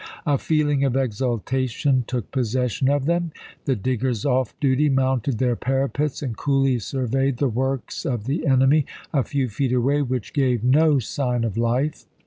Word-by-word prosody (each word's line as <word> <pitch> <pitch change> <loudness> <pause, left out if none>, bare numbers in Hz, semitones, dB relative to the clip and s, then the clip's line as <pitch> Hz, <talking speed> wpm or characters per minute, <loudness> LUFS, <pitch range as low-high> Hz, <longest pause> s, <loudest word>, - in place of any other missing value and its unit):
A 145 -4 +2
feeling 145 -3 +1
of 135 -1 +1
exultation 130 +2 0
took 125 -5 -4
possession 125 +1 0
of 140 -1 +1
them; 170 +1 0 0.3
the 135 - +1
diggers 125 +1 -1
off 130 -4 0
duty 140 +1 +2
mounted 130 -2 +1
their 125 0 +1
parapets 135 +4 -1
and 125 -5 -3
coolly 135 -1 +1
surveyed 135 +3 -1
the 140 - +1
works 130 +2 -2
of 120 -5 -2
the 145 +7 -2
enemy, 135 +2 +4 0.3
a 140 - +3
few 135 0 -1
feet 125 +4 -1
away, 135 +4 +2
which 125 -5 -3
gave 125 -5 +1
no 145 +4 +4
sign 125 0 -1
of 110 -4 -2
life. 125 +6 0
130 Hz, 160 wpm, -23 LUFS, 125-140 Hz, 0.3 s, enemy